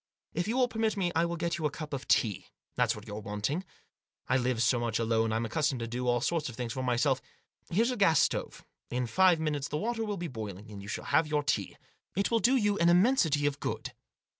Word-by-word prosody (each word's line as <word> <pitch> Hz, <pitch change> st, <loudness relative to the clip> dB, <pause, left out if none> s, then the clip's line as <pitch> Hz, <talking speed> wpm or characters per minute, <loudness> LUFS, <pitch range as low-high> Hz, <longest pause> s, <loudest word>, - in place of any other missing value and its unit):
If 175 Hz, +3 st, -1 dB
you 235 Hz, +4 st, 0 dB
will 255 Hz, -1 st, +4 dB
permit 225 Hz, -2 st, -1 dB
me 180 Hz, -3 st, 0 dB
I 165 Hz, +1 st, +3 dB
will 170 Hz, 0 st, -2 dB
get 170 Hz, 0 st, -2 dB
you 155 Hz, -, +1 dB
a -, -, -3 dB
cup 150 Hz, +1 st, -7 dB
of 135 Hz, -1 st, -4 dB
tea; 105 Hz, -6 st, +1 dB, 0.3 s
that's -, -, +2 dB
what 105 Hz, 0 st, -10 dB
you're 105 Hz, -1 st, -6 dB
wanting. 105 Hz, -, -2 dB, 0.6 s
I -, -, +2 dB
live 125 Hz, -2 st, +1 dB
so 120 Hz, +2 st, +3 dB
much 115 Hz, -2 st, -1 dB
alone 115 Hz, -1 st, +1 dB
I'm 115 Hz, +1 st, 0 dB
accustomed 145 Hz, +3 st, 0 dB
to 115 Hz, -, -3 dB
do 125 Hz, +2 st, -3 dB
all 120 Hz, -1 st, +2 dB
sorts 165 Hz, -2 st, 0 dB
of 120 Hz, -, -9 dB
things 120 Hz, -2 st, -4 dB
for 130 Hz, -, -3 dB
myself. 130 Hz, +2 st, +1 dB, 0.5 s
Here's 225 Hz, +8 st, +2 dB
a 250 Hz, -, -3 dB
gas 165 Hz, -8 st, +4 dB
stove; -, -, -1 dB, 0.2 s
in 125 Hz, 0 st, -1 dB
five 180 Hz, +6 st, +4 dB
minutes 150 Hz, -3 st, -1 dB
the 150 Hz, -, -3 dB
water 225 Hz, +6 st, -1 dB
will 210 Hz, -2 st, -3 dB
be 175 Hz, -1 st, -3 dB
boiling; 105 Hz, -, -7 dB
you 100 Hz, -, -10 dB
shall 105 Hz, -, -4 dB
have 160 Hz, -, +3 dB
your 150 Hz, -1 st, 0 dB
tea. 145 Hz, -, -1 dB, 0.4 s
It 200 Hz, +4 st, 0 dB
will 230 Hz, -, +3 dB
do 250 Hz, +4 st, +4 dB
you 210 Hz, -4 st, +2 dB
an 170 Hz, -, +5 dB
immensity 175 Hz, -, +4 dB
of 145 Hz, -1 st, 0 dB
good." -, -, -4 dB
145 Hz, 240 wpm, -30 LUFS, 120-180 Hz, 0.6 s, an